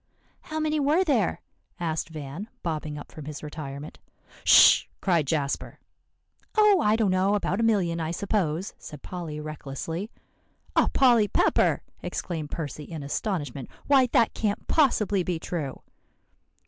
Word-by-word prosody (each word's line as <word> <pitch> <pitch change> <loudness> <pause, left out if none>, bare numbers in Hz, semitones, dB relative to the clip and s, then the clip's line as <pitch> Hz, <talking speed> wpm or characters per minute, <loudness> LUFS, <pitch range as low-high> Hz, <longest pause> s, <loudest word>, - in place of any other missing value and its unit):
"How 315 0 -4
many 310 0 0
were 300 +6 +3
there?" 255 - +1 0.4
asked 165 -1 -2
Van, 155 +6 -7
bobbing 155 -3 -3
up - - -10
from 155 - -9
his 150 0 -7
retirement. 150 -1 -7 0.4
"Sh!" - - +7
cried 170 -7 +1
Jasper. 140 -2 -2 0.8
"Oh! 420 -4 +6
I 210 +1 +4
don't 220 -4 +2
know; 190 +2 +2
about 200 0 -1
a - - +2
million, 190 -7 +2
I 160 -1 -2
suppose," 185 -1 -1
said 150 -3 -10
Polly 165 -4 -6
recklessly. 155 +5 -5 0.7
"O - - +4
Polly 240 -5 +5
Pepper!" - - +2 0.2
exclaimed 160 -5 -4
Percy 150 -2 -5
in 160 -2 -7
astonishment; 145 - -3 0.2
"why, 270 -3 +5
that 240 -2 +3
can't 205 -2 -2
possibly 215 - +2
be 175 -1 -2
true." 160 -5 -5
175 Hz, 140 wpm, -26 LUFS, 150-215 Hz, 0.8 s, Sh